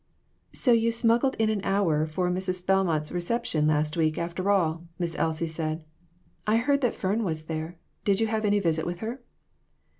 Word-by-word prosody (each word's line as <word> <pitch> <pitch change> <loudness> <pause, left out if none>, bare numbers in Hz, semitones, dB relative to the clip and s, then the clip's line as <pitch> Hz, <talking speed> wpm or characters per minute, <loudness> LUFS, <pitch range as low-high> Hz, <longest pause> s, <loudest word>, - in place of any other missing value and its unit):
"So 250 - +1
you 230 0 +4
smuggled 235 +3 +2
in 220 -1 +2
an 210 -2 -1
hour 165 -7 +1
for 180 +3 -1
Mrs. 185 0 -2
Bel 195 0 +3
mont's 155 -3 -1
reception 175 -4 0
last 150 0 +1
week, 155 -2 +1
after 175 +3 -2
all," 170 -4 +1
Miss 170 -2 -2
Elsie 160 0 0
said. 160 0 -3 0.6
"I 215 +1 +4
heard 280 +4 +2
that 245 -4 +1
Fern 205 +5 0
was 160 -5 -2
there; 160 +2 -5 0.3
did 200 -1 +2
you 225 - +3
have 220 0 -1
any 205 0 +3
visit 165 -5 +1
with 175 0 -4
her 235 +4 -4
180 Hz, 185 wpm, -27 LUFS, 160-220 Hz, 0.6 s, you